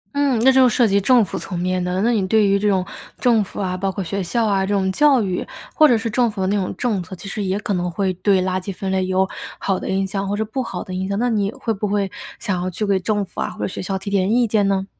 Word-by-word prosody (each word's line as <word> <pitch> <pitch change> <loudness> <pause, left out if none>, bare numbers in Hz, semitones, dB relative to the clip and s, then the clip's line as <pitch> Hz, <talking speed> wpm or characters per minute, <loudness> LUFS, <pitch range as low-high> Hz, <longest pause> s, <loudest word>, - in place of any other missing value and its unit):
嗯， 280 -4 +2
那 265 - +7
就 260 -1 +5
涉 235 0 +3
及 200 0 +2
政 240 +2 +4
府 - - -5
层 180 - -6
面 180 +1 -1
的。 180 +1 -1
那 235 - +3
你 205 -5 +1
对 215 +2 +4
于 200 0 +3
这 210 - 0
种 190 -3 +2 0.3
政 230 -4 +3
府 - - -9
啊， 185 -2 -1
包 195 +1 -1
括 195 0 -4
学 195 +3 -3
校 225 +6 0
啊， 200 -2 +1
这 190 - -2
种 190 -1 +1
教 275 +2 +4
育， 185 -2 -2 0.3
或 310 -1 +6
者 240 - +4
是 225 +1 -3
政 235 +2 +2
府 205 -3 -5
的 - - +1
那 200 - +1
种 195 -3 -1
政 220 -6 0
策， 185 +1 -8
其 190 - -10
实 200 +1 -3
也 190 +1 -1
可 210 - -2
能 180 -1 -1
会 185 +2 -1
对 190 +2 +2
垃 185 0 -1
圾 195 - -5
分 190 0 -4
类， 190 -1 0
有 190 +1 +2 0.3
好 195 -2 -1
的 - - -5
影 195 0 +1
响 195 0 -3
或 205 - 0
者 220 - -1
不 245 +5 -3
好 190 -7 -5
的 185 - -8
影 185 +1 -2
响。 200 - -1
那 245 +3 +1
你 205 -2 0
会 225 0 -3
不 210 0 -3
会 200 -1 -1 0.3
想 190 -5 -2
要 185 - -2
去 200 +4 -3
给 195 -2 +2
政 205 +1 -1
府 - - -7
啊， - - -1
或 - - -9
者 - - 0
学 - - -6
校 190 +1 -2
提 195 +1 -6
点 195 0 +1
意 245 +1 +3
见 210 -2 +2
呢？ 195 -1 0
200 Hz, 330 characters per minute, -20 LUFS, 185-220 Hz, 0.3 s, 那